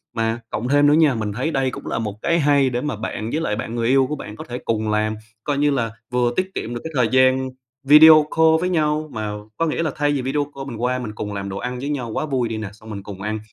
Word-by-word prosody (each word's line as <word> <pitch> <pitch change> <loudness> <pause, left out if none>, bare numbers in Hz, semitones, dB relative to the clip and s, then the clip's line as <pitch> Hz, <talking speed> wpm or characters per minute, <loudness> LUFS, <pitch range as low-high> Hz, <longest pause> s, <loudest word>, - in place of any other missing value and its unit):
Mà 115 0 0
cộng 115 +3 -3
thêm 145 +2 +4
nữa 145 - +5
nha, 155 -4 +4
mình 105 -2 -3
thấy 130 +9 -2
đây 135 -3 0
cũng - - -8
là - - -2
một 105 -3 -3
cái 170 0 +2
hay 140 -3 +3
để 120 0 -2
mà 150 -2 -2
bạn 110 +1 -4
với 155 - -1
lại 105 -10 -1
bạn 115 +1 -5
người 115 -1 0
yêu 135 +1 +4
của 150 - -2
bạn 105 -7 -8
có - - -8
thể 120 - -4
cùng 110 -1 -1
làm 110 0 0 0.3
coi 145 -1 -1
như - - 0
như 140 - 0
là 115 -3 -1 0.2
vừa 125 -1 +2
tiết 185 0 0
kiệm 120 - -4
được 120 - -5
cái 160 - -6
thời 125 -3 +3
gian 130 0 +3 0.4
video 155 +1 +9
call 160 0 +6
với 180 +2 -1
nhau, 155 -2 0
mà 110 -2 -3 0.3
có 165 - +1
nghĩa 165 +1 -1
là 155 - -1
thay 145 0 +1
vì 140 -2 0
video 140 +3 -1
call 135 0 -6
mình 120 -4 -6
qua 125 +1 0
mình 110 -4 -5
cùng 105 -1 -5
làm 100 -1 -4
đồ 95 - -5
ăn 125 +2 -4
với 140 +3 -4
nhau 130 -5 -3
quá, 155 - -2
vui 130 -5 -1
đi 110 - -3
nè. 110 -2 -5
Xong 110 +1 -15
mình 100 -2 -6
cùng 100 -2 -9
ăn, 105 +2 -3
125 Hz, 295 wpm, -21 LUFS, 110-145 Hz, 0.4 s, video